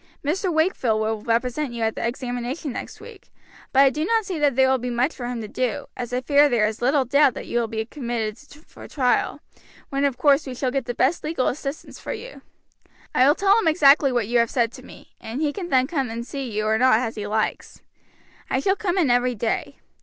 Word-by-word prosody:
Mr. 360 +5 0
Wakefield 315 - +1
will 220 0 -1
represent 245 +4 -1
you 230 -1 -3
at 220 0 +1
the - - -5
examination 245 +4 -3
next - - -7
week; 440 -4 -14 0.4
but 270 - +5
I 275 -1 +6
do 300 +3 -2
not 445 +4 +1
see 365 -5 -4
that 290 -4 +2
there 265 0 +4
will 260 0 +2
be 250 +1 -4
much 245 +5 0
for 245 -3 -6
him 245 -2 -4
to 215 - -6
do, 245 +2 -2
as 245 -1 -5
I 250 +1 -1
fear 285 +2 +4
there 235 -4 +2
is 220 +2 -3
little 265 +2 +2
doubt 275 0 +3
that - - -6
you 240 - -1
will 235 - -1
be 220 0 -3
committed 235 -5 -4 0.3
for - - -13
trial, 255 -4 0 0.5
when 275 0 -1
of 275 -3 +1
course 290 0 +3
we 255 - -5
shall 255 0 -1
get 270 -2 -2
the 245 -1 -4
best 275 +7 +1
legal 305 -4 -1
assistance 275 +2 -5
for - - -5
you. - - -9 0.7
I 255 - +4
will 290 - +5
tell 400 +2 +4
him 440 - 0
exactly 285 -3 +5
what 240 -3 0
you 240 +1 +2
have 235 -1 +2
said 235 -3 +1
to - - -12
me, - - -15
and 230 +5 -5
he 300 -2 0
can 360 -4 -6
then 260 -3 +3
come 275 -4 -2
and 230 +1 -5
see 270 -1 -5
you 215 -1 -2
or 220 +1 +2
not 255 -3 +5
as 230 -2 -2
he 210 -1 -5
likes. 215 +1 -3 0.7
I - - +1
shall 385 0 +1
come 390 -3 -2
in 310 -9 +3
every 245 0 +2
day. 225 +1 -2
255 Hz, 240 wpm, -23 LUFS, 235-295 Hz, 0.7 s, I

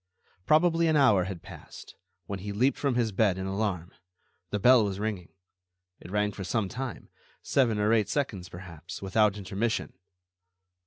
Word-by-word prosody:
Probably 165 +1 +4
an 160 - +2
hour 110 -11 +4
had 95 -3 -7
passed, - - -12 0.3
when 100 +1 -5
he 100 +2 -5
leaped 125 +7 +1
from 140 -4 0
his 120 -3 +1
bed 100 -2 +2
in 95 - -4
alarm. 95 -3 -2 0.6
The 105 - -1
bell 125 +3 +6
was 100 -1 -3
ringing. 105 -5 -3 0.7
It - - -12
rang 105 +1 0
for 100 - -7
some 105 +2 -1
time, 125 +2 -6 0.3
seven 120 -6 +2
or 105 +2 +2
eight 110 -3 +2
seconds 100 -11 -2
perhaps, 90 +1 -9
without 105 +1 +2
intermission. 100 +4 -2
105 Hz, 160 wpm, -28 LUFS, 95-120 Hz, 0.7 s, bell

